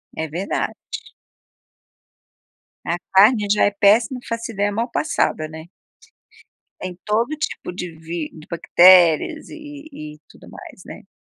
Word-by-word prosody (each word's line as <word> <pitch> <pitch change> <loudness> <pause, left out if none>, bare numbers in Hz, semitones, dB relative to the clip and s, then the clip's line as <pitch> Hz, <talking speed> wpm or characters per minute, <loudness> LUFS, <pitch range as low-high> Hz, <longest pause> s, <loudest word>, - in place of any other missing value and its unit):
É 160 - -3
verdade. 175 +6 -3 2.1
A 170 - -1 0.2
carne 210 +2 +5
já 210 - +3
é 205 - +2
péssima, 215 +5 +3
não - - -16
faço 230 0 -4
ideia 205 -1 -1
mal 230 +4 -2
passada, 155 - -1
né? 160 0 -10 1.1
Tem 180 -1 -6
todo 220 +4 +1
tipo 300 - -4
de 180 -1 -6
vi 165 -1 -5
de 155 -1 -14
bactérias 180 - +5
e - - -9 0.4
e 155 - -9
e - - -23
tudo - - -17
mais, - - -12
né? - - -11
190 Hz, 140 wpm, -21 LUFS, 165-225 Hz, 2.1 s, carne